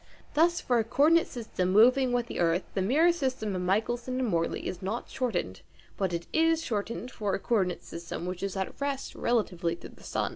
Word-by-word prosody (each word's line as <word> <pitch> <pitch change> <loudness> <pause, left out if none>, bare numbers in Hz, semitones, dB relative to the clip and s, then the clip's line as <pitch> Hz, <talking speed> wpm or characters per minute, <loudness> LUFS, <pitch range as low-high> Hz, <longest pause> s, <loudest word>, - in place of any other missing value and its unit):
Thus 340 +3 +3
for 245 -2 +1
a - - +2
co 230 +6 +1
ordinate 330 +2 +5
system 215 -7 -2
moving 250 +5 +5
with 245 -1 +1
the - - -6
earth 170 +1 +2
the 195 - 0
mirror 295 - +4
system 260 - -2
of 180 - -2
Michelson 235 +7 0
and 255 - 0
Morley 165 -5 -1
is 180 - -5
not 205 +5 -4
shortened, 180 - -2 0.3
but 190 -2 -1
it 170 0 -3
is 325 0 +3
shortened 230 +1 -3
for 205 -5 -1
a - - -3
co 240 - -3
ordinate 180 -3 -1
system 170 0 -6
which 180 0 -4
is 195 0 -3
at 190 +8 -4
rest 280 -1 -2
relatively 180 -8 0
to - - -11
the - - -18
sun. - - -1
220 Hz, 215 wpm, -29 LUFS, 185-260 Hz, 0.3 s, ordinate